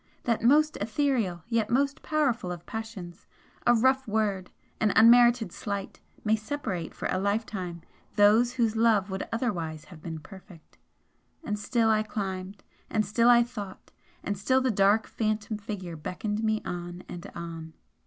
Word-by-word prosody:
that 230 -2 0
most 300 +6 +4
etherial 220 - 0
yet 230 -2 0
most 275 +2 +1
powerful 250 - 0
of 175 -1 -7
passions! 210 -6 -7 0.4
a 240 - +6
rough 260 +3 +2
word, 205 -3 -1 0.3
an 215 -2 +3
unmerited 235 -2 +6
slight, 200 +1 -5 0.2
may 215 0 +3
separate 215 - -4
for - - -4
a 185 - 0
lifetime 195 -4 -2 0.3
those 220 +4 +5
whose 230 -3 +1
love 220 -3 +3
would 190 - -4
otherwise 175 - -2
have 170 -4 -14
been 160 -1 -6
perfect. 180 0 -14 0.6
And 210 -7 -3
still 225 +1 +2
I 215 0 +3
climbed, 195 -2 -5 0.3
and 215 -1 +1
still 230 +4 +3
I 240 -1 +7
thought, 210 -6 -9 0.3
and 205 - -2
still 260 +7 +2
the 260 -1 +1
dark 200 +2 +3
Phantom 215 -1 -2
Figure 195 -5 -6
beckoned 210 +7 -4
me 220 0 0
on 175 0 -6
and 175 -1 -8
on. 165 -1 -7
215 Hz, 155 wpm, -28 LUFS, 185-230 Hz, 0.6 s, I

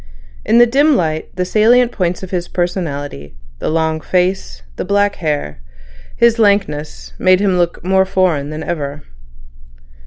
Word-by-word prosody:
In 230 - +2
the 240 - +7
dim 280 +5 +3
light, 160 -5 -1
the 180 0 -1
salient 235 +5 +3
points 180 -3 -2
of 190 - -8
his 175 -2 -2
personality, 145 - -4 0.2
the - - -2
long 160 0 0
face, 180 - -1
the - - -4
black 205 0 +1
hair, 145 - -3 0.6
his 235 0 +3
lankness, 195 -8 0
made 185 0 +4
him 190 -3 +1
look 175 0 -1
more 190 +1 +3
foreign 180 -7 0
than 155 +1 -6
ever. 145 -4 -4
180 Hz, 150 wpm, -16 LUFS, 155-200 Hz, 0.6 s, the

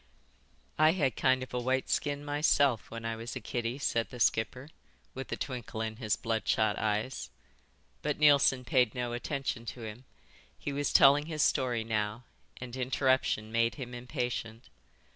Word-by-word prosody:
"I 155 +1 +6
had 145 -8 0
kind 130 -1 +2
of 130 - -10
a 125 - 0
white 130 +2 0
skin 145 0 -1
myself 145 -4 +2
when 115 0 -7
I 115 0 -2
was 115 +3 -6
a - - -3
kiddie," 120 +2 -3
said 115 -5 0
the 125 - -9
skipper, 125 +5 +1 0.4
with 135 +1 -7
a - - -2
twinkle 125 -4 -5
in 110 -1 -3
his 110 -4 0
bloodshot 110 -2 0
eyes. 105 - -2 0.7
But 150 -1 -1
Neilson 140 -4 +5
paid 125 -2 +2
no 120 -1 -2
attention 130 -1 -3
to 115 +3 -6
him. 110 +4 -8 0.5
He 145 - -4
was 145 +1 -1
telling 145 +2 +6
his 155 -3 0
story 125 -5 +1
now 110 +1 -2 0.3
and 125 -1 -7
interruption 130 -4 +1
made 115 0 +2
him 125 -4 -7
impatient. 120 -2 -4
125 Hz, 160 wpm, -31 LUFS, 115-135 Hz, 0.7 s, I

